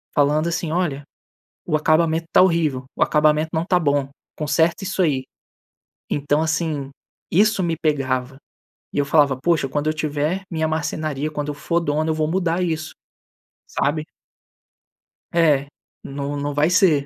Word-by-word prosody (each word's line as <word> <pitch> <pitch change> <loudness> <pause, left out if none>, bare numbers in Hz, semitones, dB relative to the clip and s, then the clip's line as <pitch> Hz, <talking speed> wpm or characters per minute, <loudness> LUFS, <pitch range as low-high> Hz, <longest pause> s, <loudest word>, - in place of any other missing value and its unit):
Falando 150 +3 +3
assim: 165 -1 -2
"Olha, 160 -5 -1 0.6
o 155 - 0
acabamento 160 +1 +2
tá - - +7
horrível, 160 -8 +2
o - - +3
acabamento 155 +1 +2
não 160 +1 0
tá 180 -1 +2
bom, 145 -3 +1 0.3
conserta 160 +5 +1
isso 195 0 -1
aí". 140 -7 +1 0.9
Então, 145 +2 +1
assim, 155 -3 -1 0.4
isso 200 +1 +3
me 165 -2 0
pegava 135 -4 -1 0.6
e - - -4
eu 140 - +2
falava: 140 -3 +3
"Poxa, 160 -5 +1
quando 145 +2 -2
eu 155 - +2
tiver 155 +4 -1
minha 160 -1 0
marcenaria, 155 -1 -2
quando 150 0 -3
eu - - -2
for 170 +3 0
dono, 155 +1 0
eu - - +1
vou 155 -1 0
mudar 175 +1 0
isso". 160 -2 -2 0.8
Sabe. 155 +2 -1 1.3
É, 155 -5 +3 0.4
não 140 +1 -4
não 145 +1 -2
vai 145 +3 +2
ser 165 -6 +4
155 Hz, 150 wpm, -21 LUFS, 145-165 Hz, 1.3 s, tá